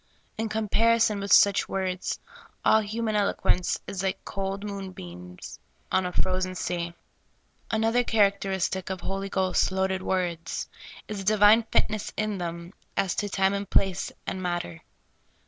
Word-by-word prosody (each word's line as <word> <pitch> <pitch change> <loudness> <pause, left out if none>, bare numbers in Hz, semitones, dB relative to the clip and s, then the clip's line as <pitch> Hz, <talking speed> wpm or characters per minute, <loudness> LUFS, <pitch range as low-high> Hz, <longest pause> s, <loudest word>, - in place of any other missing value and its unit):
In 225 0 -2
comparison 220 0 +2
with 200 0 -4
such 200 -1 +6
words, 185 -1 -2 0.5
all 220 - +6
human 215 +1 -2
eloquence 200 -3 +1
is 200 -2 -4
like 190 -1 -2
cold 195 0 -3
moonbeams 90 - -8 0.3
on 185 -1 +2
a - - -4
frozen 185 0 0
sea. 170 -1 -3 0.7
Another 225 +2 +2
characteristic 195 -4 +1
of 190 -2 -4
Holy 195 0 -3
Ghost 190 -1 +1
loaded 190 0 0
words 175 -3 -2 0.4
is 210 -2 -4
a - - -6
divine 210 +2 +6
fitness 215 -1 +1
in 215 -2 -1
them 170 +1 -5 0.2
as 195 -2 +2
to 205 - -2
time 195 0 +2
and 200 -1 -3
place 195 -1 +1
and 190 - -3
matter. 175 - -3
195 Hz, 140 wpm, -27 LUFS, 185-205 Hz, 0.7 s, such